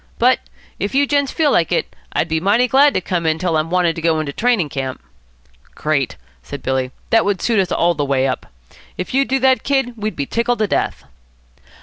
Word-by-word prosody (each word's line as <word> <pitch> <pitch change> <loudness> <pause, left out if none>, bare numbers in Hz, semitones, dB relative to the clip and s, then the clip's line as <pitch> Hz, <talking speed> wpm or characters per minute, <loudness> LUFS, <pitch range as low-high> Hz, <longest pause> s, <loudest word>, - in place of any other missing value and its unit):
But, 250 +2 +4 0.4
if 205 +6 -2
you 285 +1 +4
gents 285 -1 +1
feel 305 -3 +2
like 170 -7 +2
it, 175 - -1 0.2
I'd - - 0
be 160 -1 0
mighty 210 +8 +3
glad 280 +3 +4
to - - +1
come 170 -2 -2
in 160 0 +2
till 175 -2 -1
I'm 155 +1 0
wanted 175 -2 +1
to - - -4
go 160 -1 +2
into 145 -2 -3
training 225 - +1
camp." 135 -3 -4 0.8
"Great," 145 -4 -1 0.3
said 65 - -8
Billy; 130 -1 -1 0.2
"that 225 - +5
would 200 -2 0
suit 225 +1 +1
us 190 - 0
all 170 +1 +2
the 150 -3 -2
way 135 -2 +1
up. 130 - -3 0.5
If 180 - -5
you'd 275 +1 +2
do 265 - +1
that, 260 0 +4
Kid, 270 -3 0
we'd 215 -2 -3
be 140 - -2
tickled 235 - 0
to 215 - +1
death." 200 - -1
185 Hz, 220 wpm, -19 LUFS, 155-245 Hz, 0.8 s, that